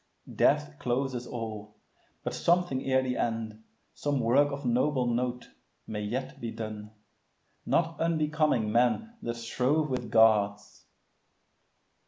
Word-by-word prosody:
Death 75 0 +2
closes 125 0 -2
all; 110 -3 -6 0.5
but - - -3
something 175 -6 +1
ere 130 0 +3
the 125 -1 -2
end, 110 -1 -2 0.3
Some 145 -2 -1
work 135 +5 +3
of 140 0 -5
noble 125 +2 +2
note, 120 +1 -2 0.3
may 105 -1 -4
yet 120 +6 -4
be 115 - -3
done, 110 -2 -6 0.8
Not 165 0 +1
unbecoming 155 -8 +1
men 125 - +2
that 120 - -3
strove 130 +6 0
with 125 -3 -2
Gods. 105 -2 +3
125 Hz, 120 wpm, -29 LUFS, 110-140 Hz, 0.8 s, ere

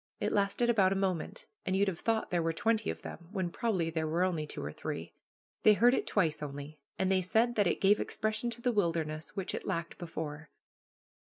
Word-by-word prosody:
It - - 0
lasted 210 +4 +2
but 190 -3 +5
a - - +2
moment, 190 -4 -2 0.2
and 185 - 0
you'd 200 +1 +3
have 180 -3 -2
thought 225 -1 0
there 175 -1 +2
were 165 0 0
twenty 225 +5 +1
of - - -5
them, 170 - -8
when 190 -4 -2
probably 185 -7 0
there 160 -1 -1
were 165 +3 +1
only 165 -5 0
two - - -6
or 75 - -4
three. - - -5 0.5
They 215 - +7
heard 240 +4 +5
it - - 0
twice 165 -8 +1
only, 145 +1 -6 0.2
and 190 0 +1
they 190 -1 +4
said 225 +6 +2
that 205 -4 +3
it - - +1
gave 200 +2 +5
expression 215 +2 -1
to 235 0 -6
the 245 0 +2
wilderness 165 -5 -1
which 195 -3 -3
it - - -4
lacked 170 -3 -3
before. 160 -3 -5
185 Hz, 215 wpm, -32 LUFS, 165-215 Hz, 0.5 s, They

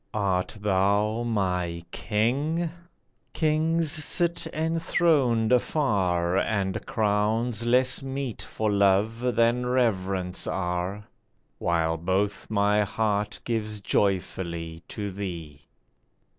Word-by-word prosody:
Art 95 -1 0
thou 100 +3 +1
my 90 -7 -1
King? 145 +10 0 0.6
Kings 160 0 +1
sit 170 +2 0
enthroned 155 -7 +2
afar, 95 - +2
And 100 -3 -1
crowns 110 +2 0
less 125 +1 +3
meet 135 -3 -4
for 110 -1 -2
love 105 +5 +2
than 120 +2 +2
reverence 95 -7 0
are, 90 +2 -2 0.6
While 80 -1 +1
both 95 +4 -1
my 105 0 +3
heart 105 0 -1
gives 110 -3 -2
joyfully 85 -5 -1
to 100 -2 -5
thee. 85 -7 -7
105 Hz, 90 wpm, -26 LUFS, 95-125 Hz, 0.6 s, less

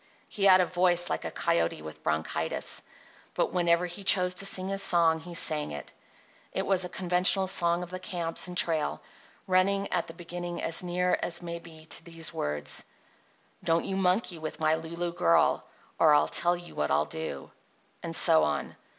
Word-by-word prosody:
He 200 - -2
had 185 -1 +7
a - - +2
voice 175 -1 +1
like - - -3
a - - -2
coyote 85 -2 -1
with 80 0 -10
bronchitis, 80 +1 -2 0.5
but - - 0
whenever 175 -1 +2
he 175 +3 -6
chose 180 -1 +4
to 195 +2 +2
sing 185 -1 +3
his 195 0 +2
song 165 -3 +4
he 170 +2 -9
sang 155 -3 +2
it. 75 -1 -8 0.6
It - - -2
was 190 -2 +3
a 180 - -4
conventional 180 +2 +3
song 175 -1 +1
of 175 - -10
the 185 - -5
camps 175 -2 -3
and 180 0 -7
trail, 160 -4 +2 0.5
running 195 +2 +2
at 175 - 0
its 165 - -11
beginning 175 0 -6
as 165 - -2
near 180 0 0
as 175 +1 -3
may 170 0 -5
be 160 -2 -14
to - - -2
these 165 -1 -4
words: 75 0 -3 0.8
Don't 165 0 +1
you 190 - -3
monkey 185 -1 0
with 155 0 -6
my 155 0 +2
Lulu 170 +2 -4
girl 85 - +2 0.3
Or 155 -2 +6
I'll 145 - +3
tell 175 +1 +1
you 175 0 -12
what - - -2
I'll - - +2
do— 160 - -6 0.5
and - - -5
so 80 - +5
on. 75 -1 -2
175 Hz, 185 wpm, -28 LUFS, 160-180 Hz, 0.8 s, had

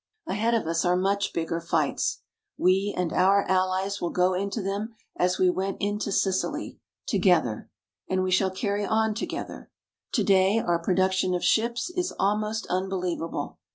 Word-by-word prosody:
Ahead 225 +4 0
of 225 - 0
us 165 +1 0
are 180 -1 +3
much 195 +2 0
bigger 165 0 -2
fights. 170 - -1 0.3
We 195 +3 +2
and 180 -2 -1
our 195 +2 +4
Allies 190 +1 0
will 175 - -1
go 180 +1 +2
into 200 +4 -2
them 205 +3 -3 0.2
as 180 +1 +1
we 185 - +3
went 190 +2 -1
into 205 0 -2
Sicily 190 -1 -1 0.3
together. - - +1 0.4
And 185 0 +1
we 185 - -1
shall 190 +1 +3
carry 200 +2 -2
on 220 +1 +1
together. 210 - -6 0.4
Today 195 +1 +3
our 175 -6 +1
production 185 +1 +1
of 175 - -3
ships 235 +8 +1
is 360 0 -2
almost 210 +2 0
unbelievable. 180 -3 -3
190 Hz, 155 wpm, -26 LUFS, 185-205 Hz, 0.4 s, our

